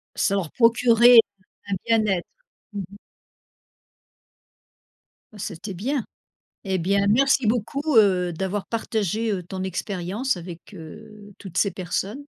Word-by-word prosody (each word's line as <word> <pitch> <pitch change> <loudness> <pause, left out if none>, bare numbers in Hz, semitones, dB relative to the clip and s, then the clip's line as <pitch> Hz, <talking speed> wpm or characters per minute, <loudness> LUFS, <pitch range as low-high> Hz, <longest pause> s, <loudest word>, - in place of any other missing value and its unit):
Ça 200 - +1
leur 180 -6 -2
procurait 235 0 +6 0.5
un 195 - 0
bien-être. 215 -6 +1 0.5
Mmh 200 - -4
mh. - - -12 2.4
C'était 195 0 -6
bien. 245 +7 -2 0.6
Et 190 -1 -1
bien, 200 +3 +1
merci 265 +2 +3
beaucoup, 235 +4 -1 0.2
heu, 185 -4 +4
d'avoir 190 +4 -3
partagé, 220 -1 -2
heu, 185 -2 -3
ton 185 +1 -6
expérience 190 +5 -3
avec, 175 +3 -10
heu, 205 +5 -12
toutes 185 -3 -6
ces 200 - +2
personnes. 190 +3 -3
200 Hz, 115 wpm, -23 LUFS, 185-225 Hz, 2.4 s, procurait